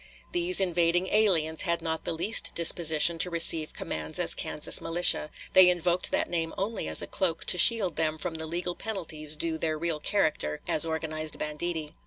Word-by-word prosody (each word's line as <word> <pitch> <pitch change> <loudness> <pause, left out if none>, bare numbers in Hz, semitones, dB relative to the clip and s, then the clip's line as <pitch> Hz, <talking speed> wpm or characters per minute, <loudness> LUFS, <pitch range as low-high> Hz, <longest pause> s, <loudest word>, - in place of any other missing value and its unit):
These 350 +1 +1
invading 175 0 -1
aliens 170 -7 0
had 170 -3 -3
not 160 -1 -6
the - - -4
least 205 +7 +1
disposition 165 0 +4
to 180 - +5
receive 165 -2 +3
commands 80 0 -6
as - - +3
Kansas - - -1
militia; 165 -2 +3 0.2
they 185 -1 +6
invoked 175 0 -1
that - - -2
name 165 -1 -5
only 210 +3 -5
as - - +2
a - - -5
cloak 175 -4 -3
to - - +5
shield 195 -5 +5
them 160 -1 -2
from 175 +1 -6
the 160 0 -7
legal 175 +2 -4
penalties 160 -8 -3
due 160 +1 -4
their 155 -1 -3
real 165 -1 -4
character 155 - -3
as 155 - +4
organized 155 -1 -6
banditti. 155 0 -5
165 Hz, 180 wpm, -25 LUFS, 155-180 Hz, 0.2 s, they